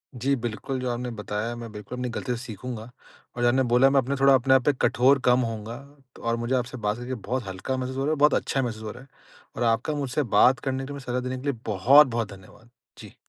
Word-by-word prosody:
जी, 135 +3 +1
बिल्कुल, 120 +2 -4
जो 125 0 -2
आपने 120 +1 -3
बताया 105 +1 -4
मैं 115 -1 -8
बिल्कुल 105 +4 -8
अपनी 125 0 -3
गलतियों 125 -2 -2
से 120 - -8
सीखूँगा। 115 +1 -7 0.5
और 120 - -4
जो 120 - +4
आपने 130 +2 +3
बोला 125 +3 +6
मैं 135 0 +1
थोड़ा 135 0 +6
अपने 130 0 +4
आप 130 -2 +4
पे 145 - +4
कठोर 135 +3 +4
कम 125 0 +5
होऊँगा 115 -1 -4 0.5
और 115 0 +1
मुझे 120 +2 -2
आपसे 125 0 -2
बात 105 -1 -1
करके 120 +1 -5
बहुत 125 -1 -2
हल्का 95 +8 -4
महसूस 130 0 -4
हो - - -1
रहा - - -1
है - - +2
और 155 - 0
बहुत 150 0 +5
अच्छा 135 - 0
महसूस 110 -3 -4
हो 110 - -5
रहा 120 - -12
है। - - -19 0.5
और - - -2
आपका 115 +6 +1
मुझसे 145 0 -1
बात 125 +3 +6
करने 135 -1 -3
के 135 - -7
लिए, 145 - -6
मुझे 140 -2 -9
सलाह 125 0 -1
देने 130 +1 -4
के 125 - -9
लिए 120 - -3
बहुत-बहुत 115 +2 +4
धन्यवाद। 100 +5 -16 0.3
जी। - - -12
125 Hz, 255 wpm, -25 LUFS, 115-130 Hz, 0.5 s, बोला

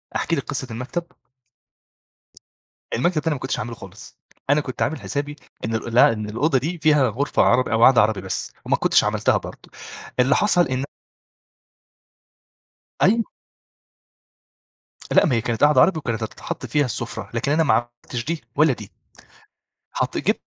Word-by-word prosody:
أحكي 165 - 0
لكِ 140 - -2
قصة 130 +1 -4
المكتب؟ 130 +9 -5 1.8
المكتب 165 +9 0
التاني 155 +1 0
ما 140 - -5
كنتش 130 - -3
هاعمله 115 +2 -5
خالص. 95 0 -12 0.3
أنا 145 +2 +4
كنت 130 -3 -7
عامل 155 +2 -1
حسابي 145 +1 -4 0.3
إنه 110 +1 -1
لأ، 115 0 +4
إن 105 -1 -5
الأوضة 135 +6 +1
دي 160 +8 -2
فيها 150 -4 +3
غرفة 135 +7 +1
عربي 125 +1 +2
أو 115 +1 +3
قعدة 130 -3 +7
عربي 105 -2 +1
بس، 95 - -4
وما - - +2
كنتش - - +3
عملتها - - +1
برضه، - - -10 0.5
اللي 130 +3 +4
حصل 180 -5 +3
إنه 130 +1 -2 2.2
أيوه. 225 +4 +3 1.8
لا - - +5
ما 130 - +1
هي 115 - +1
كانت 115 +3 -2
قعدة 145 -3 +6
عربي 175 -4 +3
وكانت 115 -5 -3
هتتحط 110 - -6
فيها 145 -1 +1
السفرة، 120 -1 -5
لكن 115 +4 -1
أنا 160 +2 +3
ما 150 - +3
عملتش 120 0 -3
دي 165 0 -3
ولا 150 -1 +4
دي، 105 -4 -10 1.0
حطيت - - -2
جب - - +4
130 Hz, 155 wpm, -22 LUFS, 115-150 Hz, 2.2 s, قعدة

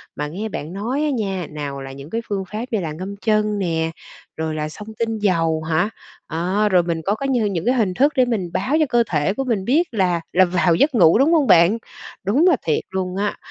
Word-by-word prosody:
mà 150 - -3
nghe 200 +8 -5
bạn 160 -1 -6
nói 235 +9 -2
á 305 - +1
nha, 195 - -2
nào 145 -2 -5
là 135 - -7
những 140 +3 -10
cái 230 +1 -2
phương 195 -2 -1
pháp 215 +3 -3
như 220 - +1
là 165 -4 -3
ngâm 185 +5 -6
chân 215 -1 +2
nè, 165 -3 -1 0.5
rồi 160 -1 -2
là 155 0 -3
xông 210 +7 -10
tinh 225 -1 -1
dầu 165 -5 +1
hả? 160 +5 +1 0.4
À, 185 +6 0
rồi 180 -2 +4
mình 170 -1 -2
có 200 - +1
cái 275 +4 -3
như 245 -5 +1
những 185 -4 -2
cái 250 - +3
hình 210 -7 +1
thức 285 +9 +2
để 255 -2 +4
mình 205 -8 -2
báo 255 +10 0
cho 310 - +4
cơ 240 -1 +3
thể 150 +4 +1
của 270 - -2
mình 220 -7 -1
biết 315 - +2
là 180 -6 +1
là 185 +1 +6
vào 175 -1 +2
giấc 275 - +2
ngủ, 170 -4 +6
đúng 290 +7 +4
hông 300 -5 +3
bạn? 170 +6 +5 0.5
Đúng 270 - +3
là 350 - +5
thiệt 155 - +1
luôn 185 -1 -3
á, 205 +1 -1
195 Hz, 245 wpm, -21 LUFS, 165-230 Hz, 0.5 s, là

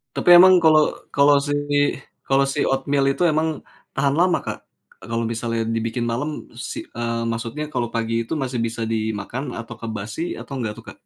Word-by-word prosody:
Tapi 175 - +3
emang 185 -2 +7
kalau 155 -1 +5 0.2
kalau 140 +1 +5
si 145 - -3 0.7
kalau 135 0 +2
si 135 - 0
oatmeal 135 +1 +1
itu 175 +5 +1
emang 155 -1 0 0.3
tahan 140 +1 +1
lama, 175 +1 +3
Kak? - - -6 0.5
Kalau 115 0 -2
misalnya 115 0 -2
dibikin 115 +1 -2
malam, 145 +6 -3
si - - -6
eee, 115 0 -3
maksudnya 115 +6 -3
kalau 120 -5 -3
pagi 115 0 -1
itu 115 - -18
masih 125 -3 -2
bisa 115 0 -3
dimakan 110 +4 -3
apakah 115 -1 -7
basi 110 - -4
atau 140 - -7
nggak 115 -5 -2
tuh, 115 - -15
Kak? - - -39
120 Hz, 175 wpm, -22 LUFS, 115-145 Hz, 0.7 s, emang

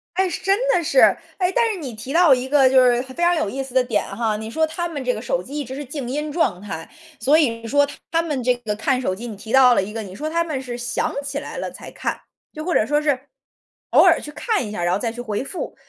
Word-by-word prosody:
哎， 380 0 +2
真 390 +3 +1
的 355 -8 +3
是， 340 +11 +2 0.4
哎， 365 -1 +2
但 475 -1 +4
是 385 - -6
你 275 -6 -5
提 255 +6 -7
到 335 -5 +6
一 250 +1 -4
个 270 -1 +5
就 260 0 +5
是 245 -1 +3
非 260 +6 -5
常 350 0 +4
有 310 -11 0
意 270 +4 -3
思 265 -2 -11
的 255 -1 +4
点 235 -4 0
哈， 220 -2 0
你 220 - -6
说 320 +6 +1
他 345 +2 -3
们 290 -5 -5
这 250 - +1
个 - - -5
手 - - -1
机 285 - -7
一 - - -2
直 255 - -7
是 290 +2 -5
静 270 -1 -6
音 295 +4 -3
状 285 - 0
态。 165 -6 -6 0.3
所 270 +7 +3
以 310 -6 +5
你 230 0 -7
说 285 +3 +3 0.2
他 330 0 +3
们 300 -6 -2
这 250 0 +3
个 225 -4 -4
看 255 +4 0
手 185 -7 -1
机 235 +4 -7
你 220 - -6
提 220 +3 -10
到 255 -1 +7
了 - - +3
一 195 - -5
个， 220 0 -4
你 185 - -10
说 305 +6 -4
他 335 +1 +1
们 300 -5 -3
是 245 -2 -6
想 240 0 -2
起 280 0 -3
来 - - -8
了 - - -4
才 - - -10
看， - - -4 0.3
就 310 - -6
或 350 +1 -1
者 - - +4
说 295 +4 +1
是 285 -4 +1 0.7
偶 - - +6
尔 - - +5
去 295 - -8
看 430 - -1
一 210 - -7
下， 175 -5 -3
然 175 +1 +1
后 - - +1
再 230 0 -2
去 235 - -10
回 220 0 -3
复。 355 - -6
265 Hz, 310 characters per minute, -21 LUFS, 235-310 Hz, 0.7 s, 到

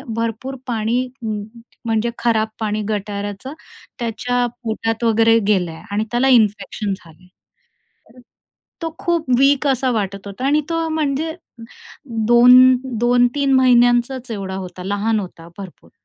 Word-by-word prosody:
भरपूर 230 +4 -3
पाणी, 235 +2 -1 0.2
म 215 -2 -3 0.4
म्हणजे 225 +1 0
खराब 225 -2 +1
पाणी, 215 -1 -2
गटाऱ्याचं, 205 +4 -4 0.5
त्याच्या 245 +1 -1 0.2
पोटात 225 0 -2
वगैरे 225 0 +4
गेलं 185 -5 +1
आहे 160 - -11
आणि 210 +2 0
त्याला 245 +3 +2
इन्फेक्शन 210 -3 +1
झालं 165 -4 -13
आहे.” 180 - -21 1.5
तो 325 -1 -4
खूप 340 -3 -1
वीक 275 +1 +3
असा 260 -1 +1
वाटत 200 -2 -3
होता 200 +6 -7
आणि 295 +2 +3
तो 330 0 -1
म्हणजे 315 +1 -1 0.9
2-2-3 250 +2 +4
महिन्यांचाच 245 0 +3
एवढा 195 -3 -5
होता, 185 -1 -7
लहान 205 +2 0
होता 170 -3 -10
भरपूर. 190 -3 -11
230 Hz, 125 wpm, -19 LUFS, 205-255 Hz, 1.5 s, वगैरे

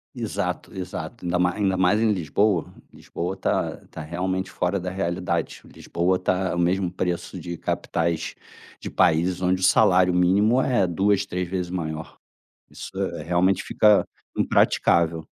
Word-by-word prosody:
Exato, - - -3
exato, 90 -3 -6
ainda 90 0 0
mais 90 0 +1
ainda 95 -3 +1
mais 90 +3 +3
em 115 -1 +3
Lisboa, 95 0 0 0.2
Lisboa 90 +3 -5
tá - - -1
tá 80 - -7
realmente 95 +4 -3
fora 90 +2 -1
da 90 0 -4
realidade, 90 -1 -2
Lisboa 90 +2 -1
tá 90 0 -1
o - - -2
mesmo 90 +1 +1
preço 90 -1 -3
de 85 -1 -6
capitais 85 0 -2 0.5
de - - -6
países 90 +3 +2
onde 90 0 +1
o - - -2
salário 90 0 +4
mínimo 100 +8 +3
é 120 -8 +2
2, 95 +3 +1
3 90 0 -3
vezes 90 0 -3
maior, 80 -3 -5 0.5
isso, - - -9
eh, - - -3
realmente, 90 +3 +2
fica 105 -2 +4 0.3
impraticável. 80 -1 +2
90 Hz, 150 wpm, -24 LUFS, 85-95 Hz, 0.5 s, salário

